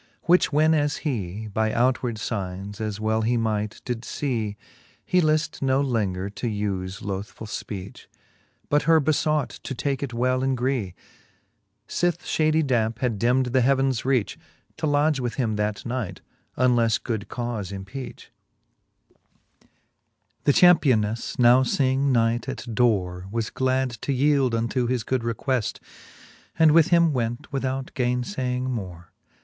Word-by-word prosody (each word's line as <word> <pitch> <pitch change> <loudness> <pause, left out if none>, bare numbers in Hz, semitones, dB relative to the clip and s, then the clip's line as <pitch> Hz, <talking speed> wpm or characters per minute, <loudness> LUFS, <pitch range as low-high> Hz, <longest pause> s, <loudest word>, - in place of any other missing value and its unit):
Which 175 0 +4
when 155 +2 +4
as 145 -2 +1
hee 110 - -3
By 110 +1 -1
outward 125 0 +1
iignes, 100 -1 -5
as 105 -2 -3
well 110 +1 0
he 120 +2 +1
might, 110 -2 -2
did 120 -2 -3
fee, 115 -7 -3 0.5
He 180 - +3
lift 155 0 0
no 135 0 +2
lenger 105 -9 -1
to 100 +4 -5
ufe 100 -3 -3
lothfull 100 +2 -5
fpeach. 100 -2 -7 0.6
But 145 0 +2
her 165 -1 +7
befought 155 -1 +1
to 135 - -5
take 140 +2 -2
it 140 -3 -3
well 130 +2 0
in 135 0 +1
gree, 120 -7 -1 0.9
Sith 175 +5 -1
fhady 155 0 +2
dampe 115 -4 +1
had 120 -4 -1
dimd 125 +2 +2
the 130 0 +3
heavens 135 -1 +2
reach, 130 -6 0 0.4
To 155 - -1
lodge 145 0 +2
with 120 -3 -3
him 115 -5 0
that 105 0 -2
night, 115 -7 -4 0.4
unles 120 -3 +3
good 110 -4 -3
caufe 120 -6 -4
empeach* 120 +6 -8
XXII. - - -40 0.8
The - - +6
championeflTe, 125 -12 +3
now 125 +1 +6
feeing 135 +1 +1
night 115 +1 +1
at 135 - -6
dore, 95 -6 +1
Was 115 +1 -3
glad 130 0 0
to - - -2
yeeld 135 -2 +2
unto 115 +2 0
his 125 -2 -1
good 130 +3 -1
requeft, 115 +1 -1 0.8
And 160 -2 +6
with 160 0 +6
him 170 -3 +4
went 120 +3 -3
without 135 0 -2
gaine 125 -1 0
iaying 125 -5 -2
more. 95 -9 -5
125 Hz, 145 wpm, -24 LUFS, 110-135 Hz, 0.9 s, her